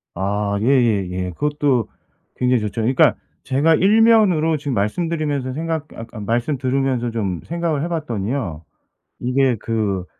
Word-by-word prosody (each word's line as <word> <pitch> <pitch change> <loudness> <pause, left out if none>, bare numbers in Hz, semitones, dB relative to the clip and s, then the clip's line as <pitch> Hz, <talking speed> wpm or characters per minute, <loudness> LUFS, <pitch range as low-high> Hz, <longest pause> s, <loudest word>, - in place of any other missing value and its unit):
아, 100 +2 -1
예예예. 100 -8 +1
그것도 145 - 0 0.5
굉장히 125 -1 +2
좋죠. 105 +1 -3
그러니까 125 +4 +3 0.3
제가 150 +5 +3
일 205 +7 +4
면으로 185 -9 +4
지금 145 -2 -4
말씀드리면서 145 - -1
생각 160 +1 -2
아 - - -34 0.2
그러니까 115 -1 -10
말씀 120 +7 -1
들으면서 130 -2 0
좀 100 -7 -3
생각을 170 -3 -2
해 - - -1
봤더니요. 115 - -3 0.6
이게 125 0 +1
그 105 -5 -2
130 Hz, 325 characters per minute, -20 LUFS, 105-155 Hz, 0.6 s, 일